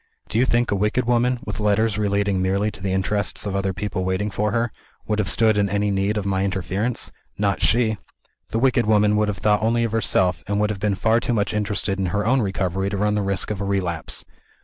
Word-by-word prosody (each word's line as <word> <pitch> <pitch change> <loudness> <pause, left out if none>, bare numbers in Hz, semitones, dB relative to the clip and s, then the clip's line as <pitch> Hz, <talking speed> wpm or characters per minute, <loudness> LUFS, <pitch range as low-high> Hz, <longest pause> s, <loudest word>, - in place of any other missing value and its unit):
Do 110 - 0
you 130 - +3
think 120 0 +1
a - - +2
wicked 105 +5 0
woman 120 +1 +2
with 105 -1 -5
letters 105 +1 +1
relating 100 -2 +1
merely 100 +3 +1
to - - -12
the 95 -1 -2
interests 95 +2 -1
of 100 -1 -2
other 100 0 0
people 95 0 -3
waiting 95 +3 -1
for 105 +1 -1
her 115 +1 0 0.3
would 105 0 -1
have 105 - +1
stood 110 -2 +3
in 100 -1 +2
any 100 +1 0
need 100 +2 0
of 105 - -2
my 95 -1 0
interference? 100 +4 -2 0.3
Not 100 -1 0
she! 110 -2 +2 0.5
The - - -2
wicked 120 -2 +2
woman 105 -1 +4
would 105 0 +2
have 105 -2 -2
thought 105 +2 +2
only 115 +2 +2
of 115 - -1
herself, 95 -4 +1
and 100 0 0
would 105 0 +1
have 100 - -5
been 105 -1 0
far 110 +4 +2
too 120 0 -1
much 105 0 0
interested 100 -2 -1
in 95 - 0
her 105 +4 -1
own 130 +3 +3
recovery 95 -1 -1
to 100 - -3
run 105 +1 +1
the 105 - 0
risk 100 +1 -1
of 100 -2 -3
a - - -1
relapse. 90 -5 -2
105 Hz, 240 wpm, -22 LUFS, 95-110 Hz, 0.5 s, woman